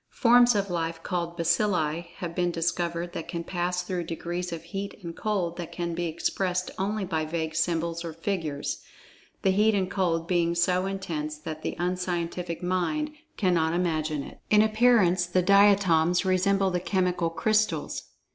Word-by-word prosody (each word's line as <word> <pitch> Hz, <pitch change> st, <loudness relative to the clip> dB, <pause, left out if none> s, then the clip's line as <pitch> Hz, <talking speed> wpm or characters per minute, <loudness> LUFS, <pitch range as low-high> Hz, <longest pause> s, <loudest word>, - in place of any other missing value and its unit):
Forms 245 Hz, -1 st, +6 dB
of 200 Hz, -2 st, 0 dB
life, 165 Hz, -1 st, -2 dB
called 170 Hz, -1 st, -3 dB
"Baccilli" 170 Hz, -2 st, +1 dB
have 170 Hz, -2 st, -5 dB
been 175 Hz, 0 st, +1 dB
discovered 170 Hz, 0 st, -2 dB
that 165 Hz, -, -5 dB
can 170 Hz, -1 st, -4 dB
pass 180 Hz, 0 st, -2 dB
through 180 Hz, -1 st, -3 dB
degrees 175 Hz, +2 st, -4 dB
of 165 Hz, -1 st, -5 dB
heat 195 Hz, +5 st, -6 dB
and 170 Hz, -1 st, -6 dB
cold 185 Hz, -6 st, -1 dB
that 175 Hz, -2 st, -6 dB
can 170 Hz, -1 st, -3 dB
be 175 Hz, +1 st, -2 dB
expressed 180 Hz, +2 st, -1 dB
only 200 Hz, +1 st, -1 dB
by 160 Hz, -4 st, -1 dB
vague 160 Hz, 0 st, -3 dB
symbols 165 Hz, +1 st, -1 dB
or 165 Hz, -, -4 dB
figures, 165 Hz, -4 st, -3 dB, 0.6 s
the 190 Hz, -, +4 dB
heat 210 Hz, +3 st, +3 dB
and 190 Hz, -2 st, 0 dB
cold 170 Hz, -4 st, 0 dB
being 170 Hz, -1 st, +1 dB
so 180 Hz, +2 st, +2 dB
intense 160 Hz, -6 st, -4 dB
that 155 Hz, 0 st, -7 dB
the -, -, -3 dB
unscientific 175 Hz, -1 st, -2 dB
mind 185 Hz, -, 0 dB, 0.3 s
cannot 170 Hz, -4 st, +2 dB
imagine 155 Hz, -4 st, 0 dB
it. -, -, -11 dB
In 210 Hz, 0 st, +6 dB
appearance 215 Hz, -6 st, +4 dB
the 180 Hz, +1 st, +1 dB
"Diatoms" 190 Hz, -3 st, +4 dB
resemble 190 Hz, +1 st, +2 dB
the 180 Hz, -, 0 dB
chemical 180 Hz, -1 st, 0 dB
crystals. 215 Hz, +5 st, 0 dB
175 Hz, 160 wpm, -27 LUFS, 165-190 Hz, 0.6 s, Forms